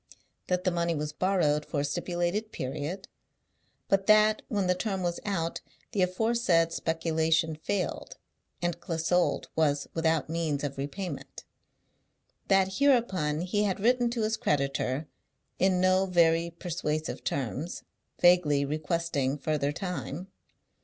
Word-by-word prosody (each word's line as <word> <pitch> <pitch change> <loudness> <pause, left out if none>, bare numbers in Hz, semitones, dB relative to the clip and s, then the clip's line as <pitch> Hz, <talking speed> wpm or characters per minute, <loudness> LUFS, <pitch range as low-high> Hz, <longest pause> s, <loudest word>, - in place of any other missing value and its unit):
That 180 0 0
the 185 - +2
money 170 -1 0
was 150 0 -3
borrowed 155 -5 +1
for 145 -2 -2
a - - 0
stipulated 175 +7 -2
period; 145 +8 -4 0.8
but 195 0 +1
that, 215 0 +5
when 200 -3 0
the 180 - +3
term 190 0 -2
was 175 -1 -1
out, 170 -5 -2 0.3
the 205 -5 0
aforesaid 185 -3 +2
speculation 160 0 +1
failed, 185 +5 -3 0.5
and 175 -1 -1
Clissold 170 +1 0
was 145 -3 +1
without 160 -2 +1
means 155 -3 -1
of 140 -1 -4
repayment. 145 +2 -5 1.0
That, 190 +1 +2
hereupon, 190 - +2
he 205 +4 0
had 195 -2 -1
written 240 +3 +3
to 235 -2 -2
his 220 +1 0
creditor, 140 - 0 0.5
in 185 -1 +3
no 185 +1 +3
very 170 -2 +3
persuasive 160 -3 -3
terms, 140 +5 -3 0.4
vaguely 165 -6 +4
requesting 150 -2 -1
further 145 -1 0
time. 180 0 -5
170 Hz, 125 wpm, -29 LUFS, 150-190 Hz, 1.0 s, that